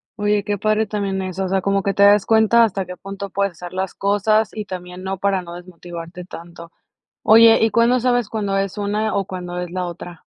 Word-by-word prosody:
Oye, 205 -1 0
qué 205 0 -1
padre 215 +2 +1
también 200 -2 -2
eso, 185 0 -3
o - - -4
sea, 190 0 +1
como 195 +1 0
que 200 - 0
te 200 - -1
das 205 0 +5
cuenta 225 +1 +4
hasta 200 -4 -1
qué 180 0 -8
punto 195 0 -7
puedes 200 0 -1
hacer 175 +1 -10
las 190 0 -3
cosas 205 +2 +1
y 215 -1 -5
también 180 -1 -8
no, 190 0 -3
para 195 0 0
no 170 -1 -10
desmotivarte 175 0 -9
tanto. 170 -1 -11 0.5
Oye, 225 +1 +7
¿y 225 - +2
cuándo 235 +2 +3
sabes 245 -2 +1
cuándo 205 -3 -2
es 195 0 -2
una 210 +2 -1
o 200 -1 0
cuándo 180 -2 -6
es 180 -1 -6
la 180 0 -3
otra? 175 -1 -9
195 Hz, 220 wpm, -20 LUFS, 180-210 Hz, 0.5 s, Oye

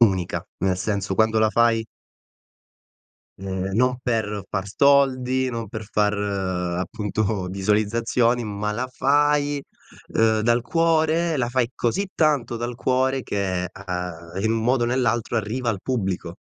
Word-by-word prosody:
unica. 95 -6 +2
Nel 95 0 +1
senso 100 0 -2
quando 110 +2 +3
la 110 0 +4
fai 115 -1 +3 1.5
ehm, 95 0 -3
non 125 +2 +2
per 105 -5 -1
far 95 +1 -3
soldi, 130 0 +3
non 115 -3 -4
per 110 +1 -6
far 105 0 +2
appunto 95 +1 -2
visualizzazioni, 115 +5 +1
ma 105 0 -3
la 125 +4 -3
fai, 145 +1 +2 0.5
ehm, 110 -1 +3
dal 120 +1 +2
cuore, 165 +1 +2
la 120 -2 0
fai 120 -1 0
così 190 - -1
tanto 145 -7 +1
dal 120 +1 -4
cuore 130 +1 +1
che 95 -3 -2
a 90 -3 -6
a 95 - -4
in 110 +2 +1
modo 120 +2 +1
o - - 0
nell'altro 120 -2 0
arriva 115 +3 -2
al 100 -3 -3
pubblico. 95 -8 -2
115 Hz, 140 wpm, -23 LUFS, 100-125 Hz, 1.5 s, la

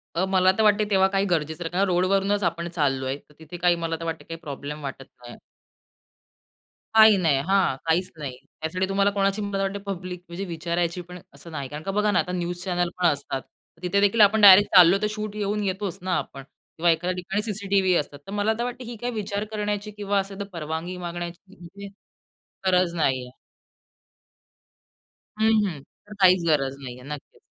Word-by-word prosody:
अ, 180 +3 +1
मला 185 -1 +4
तर 220 - +3
वाटते 210 0 +4
तेव्हा 190 -1 +4
काही 195 0 +2
गरजेसारखा 165 -1 -2
का 195 - +3
रोडवरूनच 195 +2 +1
आपण 170 0 -1
चाललोय 135 -4 -1
तर - - -20
तिथे 160 +2 -9
काही 175 0 +3
मला 165 0 -1
तर 165 - -6
वाटते 165 -1 -4
काही 165 0 -8
प्रॉब्लेम 150 -1 -7
वाटत 135 -1 -6 0.2
नाही. 120 0 -10 1.6
काही 220 -2 +8
नाही. 160 -7 +2
हां, 190 -8 +3
काहीच 175 +3 +1
नाही. 135 -4 -6 0.2
त्यासाठी 185 +4 -1
तुम्हाला 200 +1 +2
कोणाची 200 +1 0
मला 200 -1 -2
वाटते 195 +1 -2
पब्लिक 180 -2 -5
म्हणजे 175 +4 -5
विचारायची 170 0 -2
पण 180 +1 -11
असं 170 - -12
नाही. 140 -4 -5
कारण 150 +1 -7
का 195 - -3
बघा 210 +1 +1
ना, 180 - +3
आता 180 - -2
न्यूज 175 0 -3
चॅनल 175 -2 0
पण 180 - 0
असतात 140 -3 -1 0.3
तर 165 - -26
तिथे 200 +3 +1
देखील 205 +2 +3
आपण 210 +1 +5
डायरेक्ट 200 0 +9
चाललो 180 +1 +8
तर 210 - +1
शूट 215 -1 -4
घेऊन 210 0 -1
येतोच 195 -1 -2
ना 185 0 -1
आपण 135 0 -6
किंवा 165 +4 -2
एखाद्या 175 +3 -1
ठिकाणी 195 +3 -2
सीसीटीव्ही 200 -3 +1
असतात. 145 -2 -2
तर 195 - -7
मला 205 +2 +1
तर - - 0
वाटते 245 +1 -5
ही 240 0 -7
काही 245 0 -2
विचार 205 -1 -3
करण्याची 210 0 -3
किंवा 205 -1 -1
असं 195 0 -5
तर 200 - -2
परवानगी 165 +2 -4
मागण्याची 175 0 -6
म्ह - - -19
म्हणजे 200 +4 -10 0.8
गरज 180 -2 +3
नाहीये. 130 -5 0 2.1
हं, 220 +1 +4
हं. 160 -8 -5 0.3
तर 210 - -10
काहीच 185 -1 +6
गरज 135 -3 +1
नाहीये. 125 -2 -9
नक्कीच. 145 - -12
180 Hz, 190 wpm, -24 LUFS, 165-200 Hz, 2.1 s, डायरेक्ट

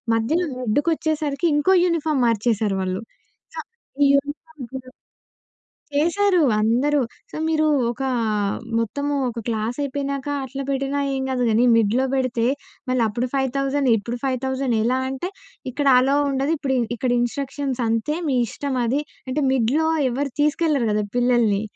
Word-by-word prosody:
మధ్యలో 315 +11 +1
మిడ్డుకొచ్చేసరికి 300 +5 0
ఇంకో 335 +6 +3
యూనిఫార్మ్ 315 -5 0
మార్చేసారు 220 -3 +1
వాళ్ళు. 185 +1 -2 0.5
సో - - -4 0.5
ఈ - - +6
యూనీఫార్మ్ 290 0 -4
చూడు 260 -1 -7 1.1
చేశారు 360 +5 +3 0.2
అందరూ. 265 +7 +2 0.3
సో - - -9
"మీరు 310 -1 +2 0.2
ఒకా 265 +2 -3 0.7
మొత్తము 285 +6 -2 0.2
ఒక 235 0 -6
క్లాస్ 225 +2 -2
అయిపోయినాక 280 0 -3 0.2
అట్లా 275 +1 -5
బెట్టినా 275 +1 -1
ఏం 265 - -2
కాదు 250 -1 0
గానీ 225 +3 +3
మిడ్‌లో 230 +4 +2
బెడితే 255 -3 0 0.4
మళ్ళీ 255 -2 +2
అప్పుడు 240 +4 -2
5,000 275 0 0
ఇప్పుడు 235 +4 -4
5,000 265 -1 -1
ఎలా?" 255 +3 +1
అంటే 270 +8 -4 0.4
"ఇక్కడ 285 +2 -1
అలో 270 +2 +2
ఉండదు 275 +3 0
ఇప్పుడి, 265 -2 -1 0.2
ఇక్కడ 245 +1 -1
ఇన్‌స్ట్రక్షన్స్ 270 +1 -2
అంతే 230 +7 0
మీ 265 - +1
ఇష్టం 275 +4 -4
అది." 270 +6 +1 0.3
అంటే 295 +3 -1
మిడ్‌లో 265 +6 +2 0.2
ఎవరు 275 +2 -2
తీసుకెళ్లరు 300 -5 +2
గదా! 210 0 +1
పిల్లల్ని. 240 -5 +3
265 Hz, 135 wpm, -22 LUFS, 240-290 Hz, 1.1 s, ఈ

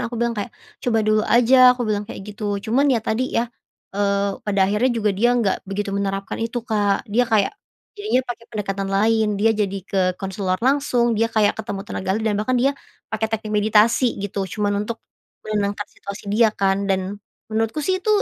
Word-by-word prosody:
aku 240 - -6
bilang, 235 0 0
"kayak 210 0 -4 0.3
coba 230 -2 +1
dulu 215 0 +3
aja" 250 +1 +6
aku 245 - -2
bilang 210 -1 -2
kayak 195 - -8
gitu 205 -1 -3
cuman 260 +6 +2
ya 250 -4 +3
tadi 250 +4 0
ya, 230 - 0 0.5
eee, 200 0 0
pada 200 -2 -1
akhirnya 210 +6 +2
juga 210 -2 +1
dia 225 +5 +2
nggak 210 -5 +1
begitu 200 0 -3
menerapkan 195 +1 -2
itu 230 +1 -3
Kak 205 -1 +1
dia 245 +1 +2
kayak, 210 -3 +2 0.4
jadinya 410 - 0
pakai 235 -2 -6
pendekatan 195 -2 -3
lain 220 +3 +2
dia 225 +2 +3
jadi 200 -2 -1
ke 195 -1 -1 0.2
konselor 190 -1 -2
langsung 255 -3 +2
dia 225 +1 +1
kayak 215 -1 +1
ketemu 200 -3 -5
tenaga 190 -3 -5
ahli 220 - -3
dan 210 -2 +1
bahkan 255 +4 0
dia 270 +3 +3 0.4
pakai 220 0 -1
teknik 215 -1 -3
meditasi 215 +4 +3
gitu 195 -1 -3
cuman 205 0 -1
untuk, 230 - -3 0.5
menenangkan 205 -1 -1
situasi 200 +1 -8
dia 225 +1 +5
kan 195 0 +1
dan, 195 +1 -1 0.3
menurutku 225 +7 -1
sih 375 0 0
itu 415 - -6
215 Hz, 190 wpm, -22 LUFS, 200-235 Hz, 0.5 s, aja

